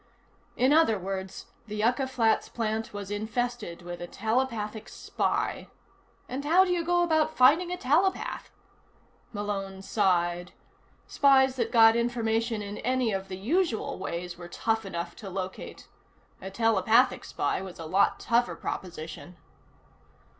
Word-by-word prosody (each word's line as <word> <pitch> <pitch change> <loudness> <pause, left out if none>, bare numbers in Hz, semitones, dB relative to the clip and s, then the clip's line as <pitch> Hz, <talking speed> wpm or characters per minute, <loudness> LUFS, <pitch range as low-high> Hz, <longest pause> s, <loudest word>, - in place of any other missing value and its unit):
In 260 +3 +4
other 305 -9 +4
words, 190 0 -5 0.2
the 210 - -6
Yucca 245 +5 +1
Flats 235 -4 +1
plant 220 -1 -2
was 205 -1 -7
infested 220 -3 -3
with 175 0 -7
a 175 - -5
telepathic 220 -1 -2
spy. - - -2 0.6
And 265 +3 -4
how 345 +6 +5
do 365 - -1
you 350 -1 0
go 350 +1 +2
about 315 -2 +1
finding 305 +8 +5
a 360 - -2
telepath? 335 +7 0 0.8
Malone 195 -2 -4
sighed. 175 -4 0 0.5
Spies 265 -2 +4
that 230 -2 -1
got 225 -1 +7
information 230 -2 0
in 205 +1 -6
any 255 -1 0
of 195 0 -3
the 185 -1 -6
usual 275 - -1
ways 175 -1 -5
were 175 - -8
tough 225 +4 -1
enough 170 -2 -5
to 200 - -8
locate. 190 0 -6 0.5
A 190 - -6
telepathic 225 +3 +3
spy 145 - -2
was 190 -2 -8
a 165 - -7
lot 190 +5 +2
tougher 235 -7 +1
proposition. 170 0 -7
220 Hz, 140 wpm, -28 LUFS, 190-255 Hz, 0.8 s, got